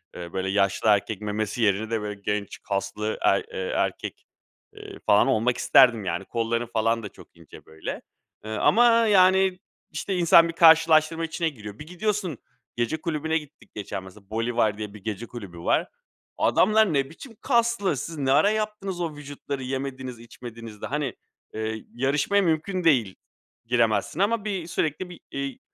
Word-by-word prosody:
eee, 85 -1 -8
böyle, 95 0 -2
yaşlı 100 +2 +1
erkek 105 0 +1
memesi 105 +2 -3
yerine 110 +1 +1
de, 115 -2 -1
böyle, 105 -1 -6
genç 105 -1 -3
kaslı 100 +1 -3
er - - +3
eee, - - -3
erkek, - - -3 0.5
eee, 415 -2 -10
falan, - - +5
olmak 120 -1 +1
isterdim. 120 -6 +5
Yani, 85 -1 -2
kollarım 115 0 -2
falan 115 0 +1
da 105 - -5
çok - - -18
ince, - - -15
böyle, 80 0 -7 0.4
ııı, 110 0 -4
ama, 235 - +5 0.2
yani, 190 -2 +4 0.3
işte, 195 - -3
insan 170 -1 +6
bir 165 - -5
karşılaştırma 165 -1 +5
içine 165 +1 -1
giriyor. 105 -7 -10
Bir 150 - -9
gidiyorsun, 185 - -2 0.4
gece 120 +6 -1
kulübüne 160 -1 -1
gittik 150 -2 -11
geçen 100 -2 -5
mesela, 95 +1 -15
Bolivar 110 -2 0
diye 105 -1 -6
bir 105 - -13
gece 110 +1 -4
kulübü 100 -9 -9
var. - - +1 0.5
Adamlar 215 -2 +3
ne 135 -1 +1
biçim 225 +8 -12
kaslı! 235 - +1
Siz 165 +5 -6
ne 135 -2 0
ara 150 +8 +5
yaptınız 210 -4 -3
o 160 -3 -3
vücutları 145 -2 -6
yemediniz, 130 -1 -5
içmediniz 115 -2 -11
de, - - -4
hani, 140 -2 -2 0.4
eee, 110 0 -4
yarışmaya 140 +10 +1
mümkün 180 +2 0
değil 120 - +3 0.5
giremezsin 115 - +1
ama 210 +2 +1
bir 190 -5 -3
sürekli 165 +2 -2
bir, 175 - -11
iii, 140 -1 -4
135 Hz, 165 wpm, -25 LUFS, 110-170 Hz, 0.5 s, insan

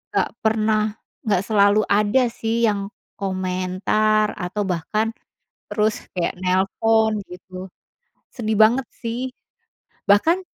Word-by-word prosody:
gak - - +1
pernah 215 -1 +1 0.3
gak 200 -3 +2
selalu 205 0 +4
ada 210 +5 +3
sih 230 0 -1
yang 200 -3 +1 0.3
komentar 190 +3 0
atau 190 +4 -2
bahkan, 200 +5 -1 0.6
terus 215 0 +1 0.2
kayak 175 - 0
nelpon 210 +4 +2
gitu, 185 +1 -9 0.6
sedih 220 -2 -3
banget 230 +4 +5 0.2
sih, 245 +2 -3 0.7
bahkan, 330 - +3
215 Hz, 100 wpm, -22 LUFS, 190-220 Hz, 0.7 s, banget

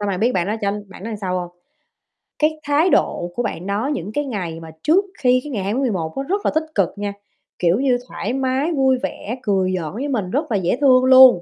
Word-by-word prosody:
Xong 205 - -2
rồi 190 -2 -1
biết 235 +5 +2
bạn 180 -4 0
đó 210 - -1
cho 200 - +1 0.2
bạn 195 - -11
đó 230 - -4
sao 185 -1 -1
hông? 175 - -6 0.9
Cái 310 0 +1
thái 295 +5 +3
độ 175 - +1
của 245 - -1
bạn 180 -4 -4
đó 210 +6 -1
những 205 - -4
cái 290 +3 -1
ngày 180 -10 -4
mà 160 -1 -10
trước 370 +6 +4
khi 255 0 +3
cái 295 - -7
ngày 205 -6 -2
20 205 +6 -1
tháng - - 0
11 175 -10 -2
á 270 - -1
rất 405 +2 -1
là - - +3
tích 315 - +2
cực 195 -5 +3
nha, 205 0 -3 0.5
kiểu 175 +4 +2
như, 260 -2 +2
thoải 230 - -4
mái, 265 +4 0
vui 265 -4 +3
vẻ 240 -4 -4
cười 190 -4 +1
giỡn 160 -1 -5
với 260 +7 -3
mình 210 -9 -2
rất 290 0 -1
là 210 - +2
dễ 185 +4 0
thương 255 -2 +5
luôn. 260 -7 +8
235 Hz, 250 wpm, -20 LUFS, 190-270 Hz, 0.9 s, luôn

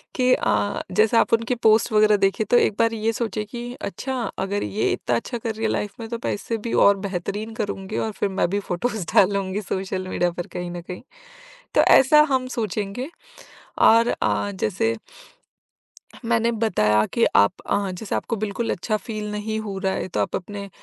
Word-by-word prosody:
कि 255 -1 +3
अ, 205 - 0
जैसे 215 +5 +3
आप 230 - +3
उनके 230 +2 +2
पोस्ट 220 0 +3
वगैरह 215 0 +5
देखे 195 +2 +1
तो 240 +4 +3
एक 210 - +2
बार 230 0 +3
ये 225 +1 -1
सोचिए 220 -2 -2
कि 240 +2 -7 0.2
अच्छा 265 0 -3 0.2
अगर 200 +1 -1
ये 210 - 0
इतना 120 - -1
अच्छा 240 - -4
कर 225 -1 -3
रही 225 - -3
है - - +1
लाइफ 205 - -2
में 225 - -6
तो 235 - -3
पैसे 225 +2 -2
भी 235 - -3
और 200 0 +5
बेहतरीन 200 +3 -4
करूँगी 205 -1 -4
और 220 - -1
फिर 205 - -2
मैं 190 -2 0
भी 200 +1 0
फोटोज़ 200 +1 -3
डालूँगी 195 +1 +2
सोशल 190 0 -3
मीडिया 175 -1 0
पर 175 0 -6
कहीं 180 0 -5
न 175 -1 -6
कहीं। 180 +1 -8 0.7
तो - - +5
ऐसा 300 +3 +7
हम 260 -1 +1
सोचेंगे। 215 - -3 0.7
और 230 +1 +6
अ, 205 - 0
जैसे 215 +4 -1 1.3
मैंने 230 0 +2
बताया 110 - +2
कि 235 - +3
आप 100 0 +5
अ, 200 -2 0
जैसे 185 +4 -4
आपको 230 - -2
बिल्कुल 225 +3 -3
अच्छा 215 +4 -1
फील 210 -1 -5
नहीं 215 +1 -3
हो 205 -3 -5
रहा 190 -1 0
है - - -3
तो - - -3
आप - - -1
अपने 200 +1 -6
210 Hz, 190 wpm, -23 LUFS, 195-230 Hz, 1.3 s, ऐसा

